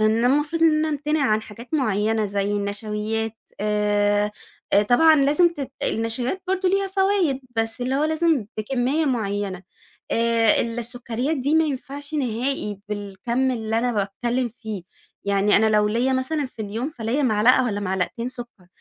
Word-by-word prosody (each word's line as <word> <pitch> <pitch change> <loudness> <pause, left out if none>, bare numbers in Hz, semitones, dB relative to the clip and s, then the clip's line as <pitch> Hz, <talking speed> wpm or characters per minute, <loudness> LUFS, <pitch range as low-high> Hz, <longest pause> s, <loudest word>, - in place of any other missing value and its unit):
أنا 220 +2 +3
المفروض 295 +5 +1
إن 320 -2 +6
أنا 315 - +1
أمتنع 300 0 0
عن 215 0 +2
حاجات 235 +7 -9
معيّنة 220 -4 +1
زي 200 0 -1
النشويات، 210 +2 -2 0.2
آآ 205 0 +1 0.4
آآ، 200 - +6
طبعًا 315 +9 +5
لازم 295 +5 +4
تت 290 -6 -6
النشويات 240 +10 -1
برضه 375 0 +1
ليها 390 +1 +1
فوايد، 385 -7 +1 0.2
بس 225 +2 -1
اللي 255 +2 -1
هو 285 +2 +2
لازم 315 -7 +1
بكمية 260 +7 0
معيّنة، 205 -7 -2 0.5
آآ، 230 -1 +3
السكريات 240 +4 -3
دي 280 +3 0
ما 320 0 +5
ينفعش 285 +1 -5
نهائي 245 -5 -2
بالكَمّ 210 +5 -2
اللي 225 -2 -1
أنا 245 +1 0
باتكلّم 235 +5 -1
فيه، 220 -4 -7 0.4
يعني 200 +1 +3
أنا 220 - +4
لو 210 -1 +3
ليّا 240 +5 +1
مثلًا 270 +2 0
في 230 -3 -8
اليوم 225 +6 -3
فليّا 250 -1 -2
معلقة 245 +1 +4
والَّا 205 -4 -1
معلقتين 190 +5 -2
سكر، 240 -7 -10
235 Hz, 155 wpm, -23 LUFS, 210-280 Hz, 0.5 s, إن